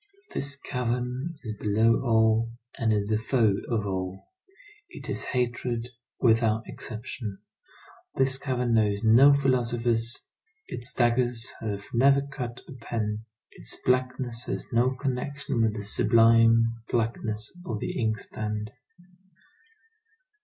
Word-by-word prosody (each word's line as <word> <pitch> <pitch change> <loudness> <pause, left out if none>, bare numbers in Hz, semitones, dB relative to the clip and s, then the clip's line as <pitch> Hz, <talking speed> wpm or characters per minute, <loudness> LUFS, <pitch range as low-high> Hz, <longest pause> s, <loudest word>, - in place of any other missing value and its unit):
This 140 0 0
cavern 125 +3 -3
is 110 -3 -4
below 110 +3 +2
all, 110 -1 +3 0.2
and 115 -3 0
is 105 -1 0
the 110 -1 +2
foe 110 -2 +2 0.2
of 110 -4 0
all. 95 - -4 0.6
It - - -6
is - - -2
hatred, 120 -1 -2 0.3
without 115 -2 +3
exception. 110 -2 -6 0.8
This 130 0 +2
cavern 125 -4 -1
knows 105 -2 +2
no 120 +6 +7
philosophers; 120 -4 +1 0.4
its 120 +2 -1
dagger 120 0 +3 0.3
has 100 -3 -4
never 135 +3 +5
cut 125 -4 -5
a - - -11
pen. 110 -1 -3 0.3
Its - - -7
blackness 125 -2 0
has - - -3
no 125 +2 +2
connection 135 -1 -2
with 110 -1 +2
the 105 - -5
sublime 115 +1 +4
blackness 110 -2 -2
of 115 -8 -3
the - - -3
inkstand. 105 -1 -3
115 Hz, 115 wpm, -27 LUFS, 110-125 Hz, 0.8 s, no